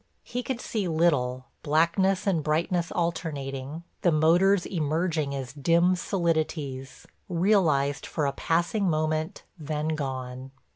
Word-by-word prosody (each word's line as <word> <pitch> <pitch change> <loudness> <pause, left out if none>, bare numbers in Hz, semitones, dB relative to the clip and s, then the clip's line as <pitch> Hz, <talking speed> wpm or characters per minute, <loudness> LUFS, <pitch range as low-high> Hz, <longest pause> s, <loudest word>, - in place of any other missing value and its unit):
He 245 - -4
could 250 -1 -3
see 210 -6 -2
little, 145 -7 +1 0.2
blackness 170 +5 +2
and 175 -6 +1
brightness 165 +3 0
alternating, 150 -3 -3 0.2
the 175 - +3
motors 175 +5 +4
emerging 155 -3 -1
as 135 -2 -5
dim 170 +5 +3
solidities, 155 -7 -2 0.2
realized 165 -6 +2
for 155 - -1
a 140 - 0
passing 175 +6 0
moment, 155 +3 -1 0.2
then 155 0 -2
gone. 130 -3 -4
160 Hz, 115 wpm, -27 LUFS, 140-175 Hz, 0.2 s, motors